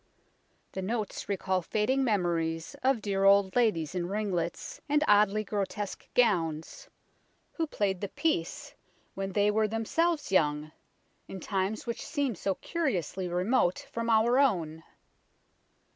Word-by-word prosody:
The 190 - -4
notes 215 +1 -3
recall 190 -1 0
fading 220 +9 0
memories 170 -7 -1
of 260 -4 +1
dear 195 -2 0
old 195 -1 +5
ladies 205 -11 +1
in 175 -2 -2
ringlets 185 -4 -3
and 295 +1 +3
oddly 210 0 +4
grotesque 205 0 -4
gowns 165 -10 +1 0.6
who 325 -2 -2
played 195 -9 -1
the 200 - -3
piece 290 - -2 0.4
when 195 0 -4
they 205 +1 +3
were 215 +1 +2
themselves 290 - 0
young, 150 -4 +1 0.6
in 190 - -7
times 195 +2 -2
which 235 -1 -4
seem 285 -5 -1
so 195 0 -2
curiously 195 - -2
remote 180 +2 +1
from 230 0 -3
our 230 +3 +4
own. 165 - +1
200 Hz, 130 wpm, -29 LUFS, 180-235 Hz, 0.6 s, old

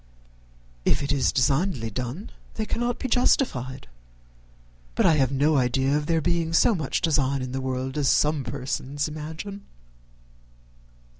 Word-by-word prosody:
"If - - +2
it 140 - -1
is 140 -2 +2
designedly 135 - +1
done, 125 - -5 0.2
they 220 - -2
cannot 240 +2 -1
be - - -3
justified; 130 - +1 1.1
but - - +2
I 165 - +6
have 135 -3 +2
no 145 +2 +2
idea 130 +2 +1
of 150 0 -1
there 165 -1 +2
being 170 -1 0
so 225 - +5
much 160 -8 -2
design 140 -4 +1
in 130 - -5
the 135 +1 -3
world 130 +2 -3
as 140 - +2
some 150 -2 +2
persons 135 +4 -3
imagine." 160 +7 -7
145 Hz, 145 wpm, -25 LUFS, 130-165 Hz, 1.1 s, I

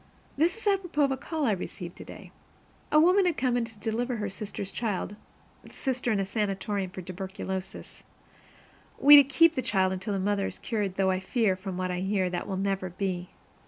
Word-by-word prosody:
This 335 +8 +2
is 450 - -12
apropos 370 -7 +1
of 275 - +2
a - - +1
call 305 +3 -3
I 230 - +3
received 180 -2 -5
today. - - -11 0.6
A 305 - +6
woman 365 +4 +5
had 340 - 0
come 255 -1 +1
to 225 -2 -9
deliver 230 +4 -2
her 210 -3 -3
sister's 200 0 -5
child 210 -3 -3 0.5
sister 255 -3 -2
in 210 - +1
a 195 - 0
sanatorium 200 -1 -2
for 185 0 -8
tuberculosis; 190 +1 -6 0.9
we 290 +1 +9
to 285 - +10
keep 315 +5 +4
the 260 - -1
child 190 -5 +1
until 190 +2 -3
the - - -1
mother 200 0 0
is - - -7
cured, 205 -5 -2
though 190 -1 +2
I 185 - 0
fear, 195 0 +1
from 185 -1 -6
what 185 0 -2
I 180 - -2
hear, 190 -1 0
that 180 - -3
will 190 -2 -3
never 195 -1 -1
be. 180 -1 -3
205 Hz, 195 wpm, -28 LUFS, 190-260 Hz, 0.9 s, to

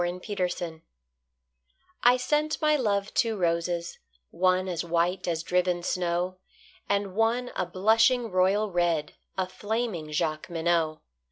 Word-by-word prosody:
The 175 - 0
White 180 -1 -2
Flag 165 -2 -6 1.2
I 245 +1 +6
sent 300 +4 0
my 305 -1 +3
love 205 -7 0
two 225 -2 +1
roses, 170 -1 -1 0.3
one 185 +1 +2
As 175 -2 -2
white 175 +2 0
as 165 -1 -1
driven 180 0 +1
snow, 180 +1 -1 0.5
And 200 -1 0
one 230 +4 +1
a - - -1
blushing 225 +6 +3
royal 195 +3 +2
red, 170 -4 0 0.2
A 190 -1 0
flaming 205 -5 -3
Jacqueminot. 160 +1 0
185 Hz, 125 wpm, -27 LUFS, 170-215 Hz, 1.2 s, I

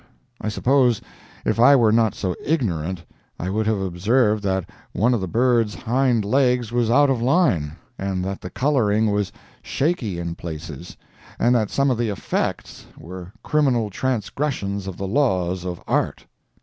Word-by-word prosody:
I 110 - -2
suppose 125 0 +2 0.5
if - - 0
I 140 +4 +7
were 115 -5 +4
not 110 -1 +3
so 90 -3 -2
ignorant 95 - -1 0.3
I 90 +3 -3
would 110 +2 0
have 110 -2 +1
observed 105 +4 +1
that 95 -3 -1 0.3
one 115 +7 +2
of 115 - 0
the 95 - -2
birds' 115 0 +2
hind 120 -2 +1
legs 125 -1 +2
was 120 -2 +1
out 140 +3 +5
of 125 -3 0
line, 120 - +2 0.3
and 95 -1 -2
that 95 0 -4
the 90 - -6
coloring 110 -5 +1
was 100 -2 -1 0.3
shaky 135 - -1
in 85 -1 -3
places, 80 -1 -8 0.4
and 120 - +3
that 110 -4 +1
some 140 -1 +1
of 120 - -1
the 120 -2 0
"effects" 100 - -3
were 90 +2 -9
criminal 130 -8 +1
transgressions 110 -4 -2
of 95 - -6
the 100 - -4
laws 95 -8 0
of 90 -1 -4
art. - - -1
110 Hz, 160 wpm, -22 LUFS, 95-125 Hz, 0.5 s, I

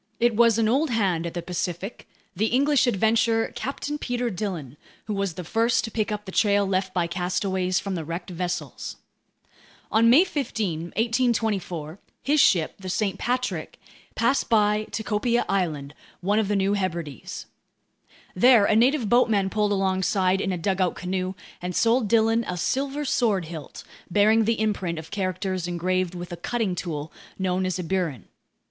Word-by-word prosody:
It 240 -1 +3
was 230 -1 +5
an 225 -1 +2
old 280 +7 +2
hand 190 -8 0
at 170 - -7
the 175 - -3
Pacific, 180 +3 -4 0.3
the 215 +5 +1
English 275 +2 +3
adventurer 225 +1 +2
Captain 290 +2 -4
Peter 245 -2 -2
Dillon, 175 - -4 0.3
who 215 - -3
was 195 -4 -2
the 180 - -5
first 230 +6 +1
to 225 - -5
pick 215 0 -1
up 210 0 -4
the 190 - -7
trail 205 0 +3
left 190 0 -1
by 180 -2 0
castaways 185 +1 -1
from 195 -1 -4
the 170 -3 -3
wrecked 170 +4 -6
vessels. 175 0 -4 1.0
On 230 +1 +5
May 280 +9 +7
15, 220 - -2
1824, 220 -8 0 0.2
his 295 +2 +2
ship, 170 - +4
the 190 -1 -6
St. 195 +1 -1
Patrick, 250 +1 -2 0.4
passed 235 +4 +1
by 210 -1 +3
Tikopia 230 +2 0
Island, 155 -7 -1 0.3
one 205 +4 +2
of 215 - 0
the 205 - 0
New 195 +1 +2
Hebrides. 170 - -4 0.9
There 235 +1 +6
a 215 - +3
native 245 +1 +3
boatman 210 -4 +3
pulled 210 -1 +1
alongside 190 -1 +1
in 195 - -1
a 180 - -1
dugout 185 +1 0
canoe 185 +1 -3 0.3
and 180 0 -4
sold 230 0 +3
Dillon 225 +1 +3
a 180 - -3
silver 275 - -1
sword 215 -9 +1
hilt 160 -3 -8 0.3
bearing 215 +4 +4
the 225 0 +1
imprint 195 -6 -1
of 160 0 -8
characters 185 -2 -2
engraved 180 +1 -1
with 175 0 -7
a 175 - -5
cutting 220 +1 -1
tool 160 -4 -5 0.2
known 185 0 0
as 185 - -1
a 180 - -3
burin. 165 - -2
195 Hz, 165 wpm, -25 LUFS, 180-225 Hz, 1.0 s, May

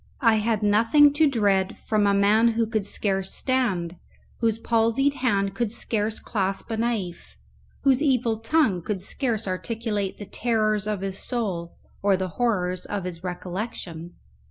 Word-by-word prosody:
I 230 -3 +5
had 215 0 0
nothing 230 +8 +5
to 305 0 +4
dread 200 -6 +1
from 210 -2 +1
a 200 - +3
man 215 +4 +4
who 230 0 +1
could 215 -3 -2
scarce 195 -2 -2
stand, 190 -10 0 0.4
whose 225 -2 +1
palsied 230 +5 +2
hand 200 -7 0
could 235 -3 -1
scarce 220 -1 -2
clasp 195 0 -2
a 225 - -1
knife, 220 -7 -3 0.5
whose 270 -1 +4
evil 250 -6 +1
tongue 225 - +2
could 190 +1 -4
scarce 225 -2 -2
articulate 210 +1 -2
the 205 - -7
terrors 215 -1 0
of 210 -3 -2
his 195 0 -3
soul 190 -9 -3 0.3
or 200 -1 +3
the 185 0 -2
horrors 185 -4 -1
of 205 -2 -3
his 180 -1 -6
recollection. 180 -2 -6
215 Hz, 155 wpm, -25 LUFS, 195-235 Hz, 0.5 s, I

